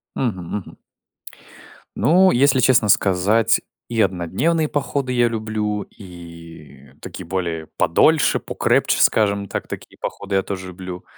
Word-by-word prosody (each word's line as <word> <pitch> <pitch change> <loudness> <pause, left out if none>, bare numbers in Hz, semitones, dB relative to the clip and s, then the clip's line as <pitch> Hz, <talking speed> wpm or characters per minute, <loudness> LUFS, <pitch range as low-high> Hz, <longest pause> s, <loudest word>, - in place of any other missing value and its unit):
Мгм, 105 -9 -2
мгм. 100 - -10 1.2
Ну, 185 +4 +4
если 135 +1 +3
честно 120 -3 +4
сказать, 100 +4 +3 0.3
и 115 - -3
однодневные 110 - 0
походы 140 -2 -2
я 120 -1 +3
люблю 110 -2 -3
и 85 - -14
такие - - -8
более 85 -4 -3
подольше, 155 - +3
покрепче, - - 0
скажем 100 -2 +2
так, - - -4
такие - - -9
походы 100 0 -5
я 95 - +2
тоже 95 -1 -6
люблю. 90 0 -8
100 Hz, 125 wpm, -20 LUFS, 90-120 Hz, 1.2 s, Ну